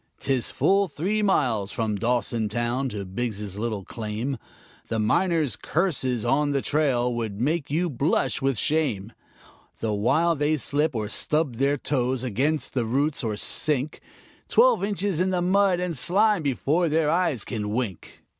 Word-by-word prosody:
'Tis 135 Hz, -3 st, 0 dB
full 195 Hz, +1 st, +2 dB
three 190 Hz, +7 st, -1 dB
miles 125 Hz, -, +1 dB
from 110 Hz, -3 st, -1 dB
Dawson 115 Hz, 0 st, 0 dB
town 120 Hz, +4 st, -1 dB
to 105 Hz, -4 st, -5 dB
Biggs' 105 Hz, -1 st, -4 dB
little 110 Hz, -4 st, -3 dB
claim; 115 Hz, +4 st, -4 dB, 0.5 s
The 115 Hz, -, -2 dB
miners' 155 Hz, -, +1 dB
curses 135 Hz, -, -1 dB
on 145 Hz, +2 st, +2 dB
the 140 Hz, -1 st, 0 dB
trail 130 Hz, -5 st, +1 dB
would 110 Hz, -4 st, -4 dB
make 150 Hz, +4 st, 0 dB
you 165 Hz, +5 st, 0 dB
blush 140 Hz, 0 st, 0 dB
with 135 Hz, -2 st, +1 dB
shame 120 Hz, -9 st, 0 dB, 0.7 s
The 110 Hz, -2 st, -1 dB
while 140 Hz, +12 st, +2 dB
they 150 Hz, +1 st, +1 dB
slip, 145 Hz, +2 st, 0 dB
or 110 Hz, -2 st, -2 dB
stub 150 Hz, +2 st, 0 dB
their 140 Hz, +3 st, +2 dB
toes 130 Hz, -2 st, -1 dB
against 135 Hz, +6 st, -1 dB
the 125 Hz, -, 0 dB
roots, 140 Hz, +5 st, 0 dB
or 110 Hz, -2 st, -1 dB
sink 145 Hz, +6 st, 0 dB, 0.5 s
Twelve -, -, +4 dB
inches 200 Hz, -3 st, -1 dB
in 185 Hz, +1 st, +2 dB
the 185 Hz, -1 st, 0 dB
mud 185 Hz, 0 st, +3 dB
and 180 Hz, -2 st, -2 dB
slime 200 Hz, -, +3 dB
before 150 Hz, +4 st, +1 dB
their 155 Hz, 0 st, +2 dB
eyes 165 Hz, -, 0 dB
can 105 Hz, -3 st, -3 dB
wink. 105 Hz, -5 st, -4 dB
135 Hz, 155 wpm, -25 LUFS, 115-160 Hz, 0.7 s, Twelve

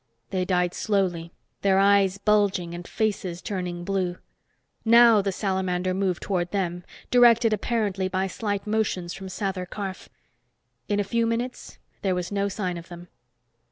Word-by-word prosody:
They 185 Hz, -2 st, 0 dB
died 180 Hz, -1 st, +1 dB
slowly, 180 Hz, -5 st, -1 dB, 0.3 s
their 195 Hz, -1 st, +3 dB
eyes 195 Hz, -1 st, +4 dB
bulging 200 Hz, -4 st, +1 dB
and 175 Hz, +1 st, -7 dB
faces 195 Hz, -5 st, -2 dB
turning 180 Hz, -3 st, -4 dB
blue. 185 Hz, -1 st, -1 dB, 0.7 s
Now 230 Hz, -1 st, +7 dB
the 195 Hz, 0 st, -1 dB
salamander 185 Hz, -2 st, -1 dB
moved 185 Hz, -2 st, -1 dB
toward 180 Hz, -3 st, -1 dB
them, 180 Hz, -3 st, -2 dB, 0.3 s
directed 235 Hz, -2 st, +6 dB
apparently 205 Hz, -3 st, -1 dB
by 185 Hz, 0 st, -1 dB
slight 205 Hz, +1 st, -3 dB
motions 210 Hz, -5 st, -1 dB
from 195 Hz, 0 st, -8 dB
Sather 190 Hz, -1 st, -3 dB
Karf. 195 Hz, -2 st, -6 dB, 0.8 s
In 205 Hz, 0 st, +1 dB
a -, -, +2 dB
few 230 Hz, +3 st, 0 dB
moments, 240 Hz, +2 st, -4 dB, 0.2 s
there 190 Hz, -2 st, +1 dB
was 180 Hz, +1 st, -3 dB
no 200 Hz, 0 st, 0 dB
sign 185 Hz, -3 st, -3 dB
of 170 Hz, -, -13 dB
them. 175 Hz, 0 st, -10 dB
195 Hz, 150 wpm, -25 LUFS, 180-205 Hz, 0.8 s, Now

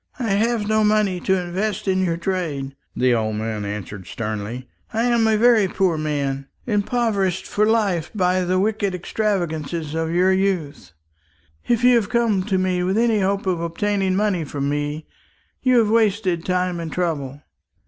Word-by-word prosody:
"I 235 Hz, -5 st, -2 dB
have 215 Hz, +1 st, +1 dB
no 215 Hz, 0 st, +2 dB
money 210 Hz, -3 st, +2 dB
to 190 Hz, +1 st, +1 dB
invest 195 Hz, +4 st, -3 dB
in 190 Hz, 0 st, +2 dB
your 170 Hz, -2 st, 0 dB
trade," 165 Hz, -7 st, -3 dB, 0.2 s
the 125 Hz, -1 st, +3 dB
old 110 Hz, -2 st, 0 dB
man 110 Hz, -1 st, -3 dB
answered 100 Hz, -2 st, -6 dB
sternly. 110 Hz, +3 st, -5 dB, 0.2 s
"I 225 Hz, 0 st, 0 dB
am 235 Hz, -2 st, +3 dB
a 220 Hz, -1 st, +3 dB
very 225 Hz, -3 st, +5 dB
poor 185 Hz, -2 st, +1 dB
man, 140 Hz, -3 st, -2 dB, 0.2 s
impoverished 205 Hz, -4 st, 0 dB
for 210 Hz, +1 st, +1 dB
life 200 Hz, -7 st, +1 dB
by 185 Hz, -1 st, +2 dB
the 180 Hz, +1 st, +1 dB
wicked 205 Hz, -1 st, 0 dB
extravagance 175 Hz, -5 st, -2 dB, 0.2 s
of 160 Hz, 0 st, -1 dB
your 180 Hz, +2 st, +3 dB
youth. 185 Hz, -, -2 dB, 0.7 s
If 240 Hz, -1 st, +1 dB
you 250 Hz, -1 st, +6 dB
have 210 Hz, -3 st, -1 dB
come 230 Hz, -5 st, +2 dB
to 195 Hz, -3 st, 0 dB
me 185 Hz, -1 st, 0 dB
with 185 Hz, +3 st, 0 dB
any 230 Hz, -2 st, +3 dB
hope 195 Hz, +1 st, 0 dB
of 180 Hz, -3 st, 0 dB
obtaining 190 Hz, +3 st, 0 dB
money 200 Hz, -4 st, +1 dB
from 140 Hz, -1 st, -3 dB
me, 145 Hz, +1 st, -2 dB, 0.6 s
you 255 Hz, -1 st, +3 dB
have 220 Hz, -2 st, +3 dB
wasted 205 Hz, -6 st, +1 dB
time 180 Hz, -1 st, 0 dB
and 165 Hz, -2 st, -5 dB
trouble." 145 Hz, -5 st, -3 dB
185 Hz, 170 wpm, -22 LUFS, 160-210 Hz, 0.7 s, you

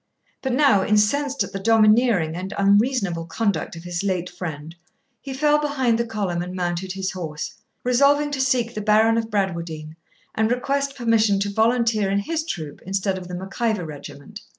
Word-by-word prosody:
But 265 Hz, -2 st, -1 dB
now, 255 Hz, -8 st, +4 dB
incensed 260 Hz, +8 st, +2 dB
at -, -, -9 dB
the 195 Hz, -, -3 dB
domineering 215 Hz, -5 st, +3 dB
and 185 Hz, +2 st, -5 dB
unreasonable 200 Hz, -4 st, +2 dB
conduct 200 Hz, -6 st, -1 dB
of 165 Hz, -, -9 dB
his 175 Hz, +1 st, -4 dB
late 180 Hz, -3 st, -1 dB
friend, 160 Hz, -2 st, -7 dB, 0.5 s
he 275 Hz, -, -7 dB
fell 295 Hz, +2 st, +2 dB
behind 265 Hz, -6 st, +1 dB
the 235 Hz, -, -1 dB
column 200 Hz, -6 st, -2 dB
and 180 Hz, +1 st, -6 dB
mounted 180 Hz, +1 st, -2 dB
his 190 Hz, -1 st, -3 dB
horse, 160 Hz, -5 st, -5 dB, 0.3 s
resolving 280 Hz, +4 st, +3 dB
to 275 Hz, -2 st, -1 dB
seek 245 Hz, -3 st, +1 dB
the 215 Hz, -, -4 dB
Baron 215 Hz, +2 st, +4 dB
of 225 Hz, -1 st, -4 dB
Bradwardine, 170 Hz, -6 st, -3 dB, 0.4 s
and 220 Hz, 0 st, +1 dB
request 275 Hz, +3 st, -1 dB
permission 225 Hz, -5 st, +2 dB
to 200 Hz, 0 st, -2 dB
volunteer 225 Hz, -2 st, +2 dB
in 200 Hz, -, +1 dB
his 310 Hz, +11 st, -2 dB
troop 160 Hz, -, -6 dB
instead 195 Hz, +1 st, -1 dB
of 180 Hz, -, -10 dB
the 180 Hz, -, -6 dB
Mac 190 Hz, +5 st, -8 dB
Ivor 220 Hz, -7 st, +1 dB
regiment. 150 Hz, +6 st, -10 dB
210 Hz, 175 wpm, -23 LUFS, 180-240 Hz, 0.5 s, now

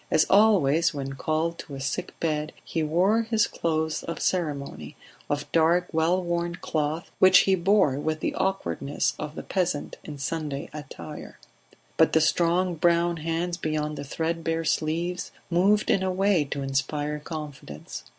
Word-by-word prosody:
As 155 Hz, -, +4 dB
always 170 Hz, -7 st, +4 dB
when 135 Hz, -1 st, -4 dB
called 160 Hz, +4 st, -1 dB
to 140 Hz, -, -8 dB
a -, -, -7 dB
sick 140 Hz, +1 st, -4 dB
bed, 155 Hz, -1 st, -1 dB
he 165 Hz, -, -2 dB
wore 180 Hz, +9 st, +3 dB
his 225 Hz, -1 st, +2 dB
clothes 160 Hz, -1 st, -1 dB
of 165 Hz, -, -5 dB
ceremony, 140 Hz, -, -2 dB, 0.3 s
of 145 Hz, -, -2 dB
dark 170 Hz, +2 st, +3 dB
wellworn 170 Hz, +1 st, +1 dB
cloth, 155 Hz, 0 st, -2 dB
which 185 Hz, 0 st, +8 dB
he 195 Hz, -, +2 dB
bore 190 Hz, -6 st, +3 dB
with 155 Hz, +1 st, -2 dB
the -, -, -1 dB
awkwardness 145 Hz, -, -1 dB
of 150 Hz, 0 st, -5 dB
the -, -, -6 dB
peasant 180 Hz, -6 st, -2 dB
in 150 Hz, -2 st, -8 dB
Sunday 145 Hz, +1 st, -4 dB
attire. 150 Hz, -2 st, -9 dB, 0.6 s
But -, -, +4 dB
the 160 Hz, -, +5 dB
strong 175 Hz, +3 st, +2 dB
brown 170 Hz, 0 st, +2 dB
hands 165 Hz, +2 st, -2 dB
beyond 155 Hz, -2 st, -2 dB
the 145 Hz, -, -5 dB
thread 165 Hz, +3 st, -2 dB
bare 165 Hz, 0 st, -1 dB
sleeves 170 Hz, +4 st, -1 dB, 0.2 s
moved 200 Hz, +5 st, +3 dB
in 190 Hz, -, +2 dB
a 190 Hz, 0 st, 0 dB
way 190 Hz, -4 st, +2 dB
to 140 Hz, 0 st, -4 dB
inspire 145 Hz, +2 st, -1 dB
confidence. 145 Hz, -, -8 dB
160 Hz, 155 wpm, -26 LUFS, 150-175 Hz, 0.6 s, which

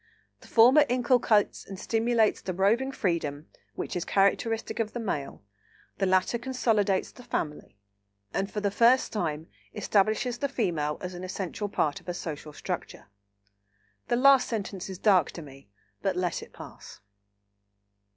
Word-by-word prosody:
The -, -, -16 dB
former 250 Hz, +6 st, +6 dB
inculcates 245 Hz, -4 st, +2 dB
and 195 Hz, -1 st, -9 dB
stimulates 225 Hz, 0 st, +1 dB
the 185 Hz, -, -4 dB
roving 225 Hz, +8 st, +2 dB
freedom 165 Hz, -, -2 dB, 0.3 s
which -, -, -4 dB
is 175 Hz, -, -1 dB
characteristic 220 Hz, +5 st, +1 dB
of 220 Hz, -2 st, -1 dB
the 240 Hz, -, -4 dB
Male, 150 Hz, -, -4 dB, 0.6 s
the 195 Hz, -, +2 dB
latter 185 Hz, +5 st, +2 dB
consolidates 225 Hz, -6 st, 0 dB
the 250 Hz, -, -14 dB
family, 150 Hz, -, -4 dB, 0.6 s
and 195 Hz, +1 st, -1 dB
for 210 Hz, -, -4 dB
the 200 Hz, -1 st, 0 dB
first 240 Hz, +5 st, +4 dB
time 160 Hz, -7 st, -2 dB, 0.3 s
establishes 220 Hz, +4 st, +1 dB
the 280 Hz, -, -1 dB
Female 165 Hz, -, -1 dB
as 180 Hz, 0 st, -5 dB
an 180 Hz, +1 st, -7 dB
essential 190 Hz, +2 st, -4 dB
part 150 Hz, -7 st, 0 dB
of -, -, -11 dB
a 175 Hz, -, -3 dB
social 155 Hz, -3 st, -6 dB
structure." 145 Hz, -, -6 dB, 1.0 s
(The -, -, +1 dB
last 270 Hz, +1 st, +5 dB
sentence 200 Hz, -4 st, -4 dB
is 190 Hz, -, -6 dB
dark 185 Hz, -5 st, +4 dB
to 170 Hz, -, -8 dB
me, 135 Hz, -6 st, -14 dB, 0.3 s
but 190 Hz, -2 st, 0 dB
let 180 Hz, -1 st, -1 dB
it -, -, -12 dB
pass.) -, -, -12 dB
200 Hz, 150 wpm, -28 LUFS, 175-235 Hz, 1.0 s, former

